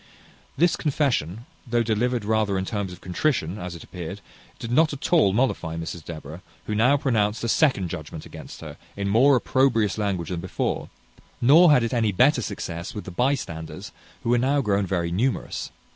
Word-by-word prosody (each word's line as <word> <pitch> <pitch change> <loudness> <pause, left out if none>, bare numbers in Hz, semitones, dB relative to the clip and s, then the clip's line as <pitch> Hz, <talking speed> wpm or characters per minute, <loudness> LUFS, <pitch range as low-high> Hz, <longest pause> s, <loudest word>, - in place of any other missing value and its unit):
This 175 +1 +3
confession, 120 - -1 0.2
though 120 0 +1
delivered 115 +1 0
rather 105 -2 +1
in 95 - -2
terms 100 -2 -3
of 90 - -11
contrition, 95 - -1
as 90 -2 -6
it 85 - -10
appeared, 90 +2 -7 0.4
did 115 - -6
not 155 +5 +4
at 140 +4 -4
all 155 - +5
mollify 95 -8 0
Mrs 80 0 -6
Deborah, 80 +1 -8 0.2
who 105 - -3
now 125 +7 +4
pronounced 110 -6 0
a - - 0
second 110 - +2
judgment 80 -2 -7
against - - -10
her, - - -9 0.2
in 100 0 -2
more 130 +7 +5
opprobrious 115 -5 +2
language 95 -5 -1
than 90 -2 -3
before; 90 +1 -3 0.5
nor 160 +8 +7
had 125 -5 +5
it 115 - -2
any 115 -3 +2
better 130 +10 +4
success 85 -3 -5
with 105 - -5
the 95 - -8
bystanders, 90 - -2 0.3
who 115 - 0
were 120 - +4
now 135 +4 +2
grown 100 -6 +1
very 85 -3 -1
numerous. 115 +9 -1
105 Hz, 180 wpm, -24 LUFS, 90-125 Hz, 0.5 s, nor